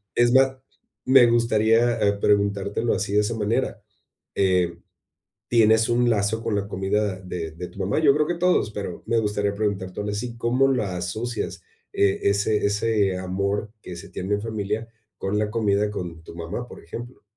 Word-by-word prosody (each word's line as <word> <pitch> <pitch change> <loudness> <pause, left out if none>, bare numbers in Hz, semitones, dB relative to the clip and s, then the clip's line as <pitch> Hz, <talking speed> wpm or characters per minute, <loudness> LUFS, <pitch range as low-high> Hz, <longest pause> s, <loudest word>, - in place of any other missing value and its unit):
Es 120 0 +4
más, 130 0 +4 0.5
me 130 -1 +7
gustaría, 115 0 +3
eh, 100 0 +3
preguntártelo 100 +2 +1
así 100 +2 -2
de 105 - +4
esa 110 +2 -2
manera, 110 +1 -1 0.5
eh, 90 -3 +1 0.7
¿tienes 110 -1 +4
un 120 0 +3
lazo 110 +1 0
con 115 -3 -1
la 100 0 -2
comida 100 0 -1
de 90 -3 -5
de 90 +3 -7
tu 100 - -14
mamá? 95 +9 0
Yo 145 -3 +5
creo 150 +1 +1
que 175 - -1
todos, 180 -10 +2
pero 100 -4 -6
me 115 - +1
gustaría 105 -1 -1
preguntártelo 100 -1 -2
así, 115 +3 -4
¿cómo 125 +4 +2
la 100 -8 -1
asocias 110 +7 -4 0.3
e 100 -1 +2
ese 105 +1 +1
ese 100 -2 +1
amor 100 +3 -2
que 90 - -8
se 85 - -10
tiene 100 +3 -2
en 105 - -4
familia 110 0 -3 0.3
con 100 +2 -2
la 105 0 0
comida 105 -2 +1
con 85 -5 -6
tu 85 - -11
mamá?, 85 +9 -5
por - - -12
ejemplo. 120 +9 -9
105 Hz, 175 wpm, -24 LUFS, 100-115 Hz, 0.7 s, me